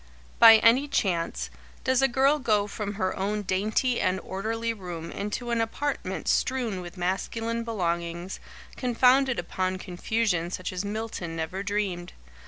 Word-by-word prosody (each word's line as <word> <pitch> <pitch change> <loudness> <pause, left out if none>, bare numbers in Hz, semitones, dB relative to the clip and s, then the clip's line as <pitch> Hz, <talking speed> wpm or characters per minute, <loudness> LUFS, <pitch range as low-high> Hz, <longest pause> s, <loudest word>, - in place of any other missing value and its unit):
By 225 -1 +11
any 235 +6 +5
chance, 165 - -1 0.3
does 260 0 +2
a 270 - +5
girl 270 +3 +3
go 215 -6 +2
from 205 0 -5
her 185 -2 -1
own 205 +2 -1
dainty 215 +6 0
and 185 0 +1
orderly 225 +4 -2
room 175 -5 -7
into 210 +4 -4
an 230 -1 +2
apartment 280 +6 -3
strewn 240 -8 0
with 175 +1 -9
masculine 225 +6 -2
belongings, 175 -4 -3 0.4
confounded 255 +1 +3
upon 185 +2 -2
confusion 185 -1 -1
such 185 +1 -4
as 180 +1 -3
Milton 205 -5 -4
never 165 +4 -3
dreamed? 195 -3 -2
205 Hz, 140 wpm, -27 LUFS, 180-230 Hz, 0.4 s, By